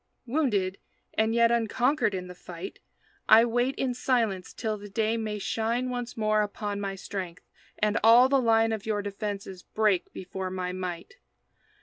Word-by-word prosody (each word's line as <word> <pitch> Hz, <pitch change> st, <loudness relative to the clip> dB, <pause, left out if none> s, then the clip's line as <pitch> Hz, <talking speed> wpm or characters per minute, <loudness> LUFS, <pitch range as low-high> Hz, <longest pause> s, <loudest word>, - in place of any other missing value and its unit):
Wounded, 220 Hz, -9 st, 0 dB, 0.3 s
and 220 Hz, +1 st, +1 dB
yet 235 Hz, 0 st, +5 dB
unconquered 235 Hz, +1 st, +1 dB
in 180 Hz, -1 st, -4 dB
the 180 Hz, -, -9 dB
fight, 180 Hz, +1 st, -9 dB, 0.5 s
I 225 Hz, +2 st, +8 dB
wait 245 Hz, +3 st, 0 dB
in 255 Hz, -2 st, -1 dB
silence 230 Hz, -7 st, 0 dB
till 220 Hz, -2 st, -3 dB
the 205 Hz, 0 st, -10 dB
day 220 Hz, +3 st, 0 dB
may 215 Hz, -2 st, -3 dB
shine 230 Hz, +5 st, -1 dB
Once 245 Hz, -1 st, -5 dB
more 215 Hz, -1 st, +2 dB
upon 205 Hz, 0 st, -3 dB
my 195 Hz, -1 st, -3 dB
strength, 185 Hz, -3 st, -6 dB, 0.3 s
and 210 Hz, +1 st, +1 dB
all 235 Hz, +3 st, +8 dB
the 270 Hz, 0 st, +3 dB
line 225 Hz, -1 st, +3 dB
Of 220 Hz, -1 st, -4 dB
your 205 Hz, -2 st, 0 dB
defenses 200 Hz, -2 st, -5 dB
break 210 Hz, -3 st, 0 dB
before 190 Hz, 0 st, -5 dB
my 185 Hz, -1 st, -3 dB
might. 180 Hz, -2 st, -6 dB
215 Hz, 160 wpm, -28 LUFS, 195-235 Hz, 0.5 s, I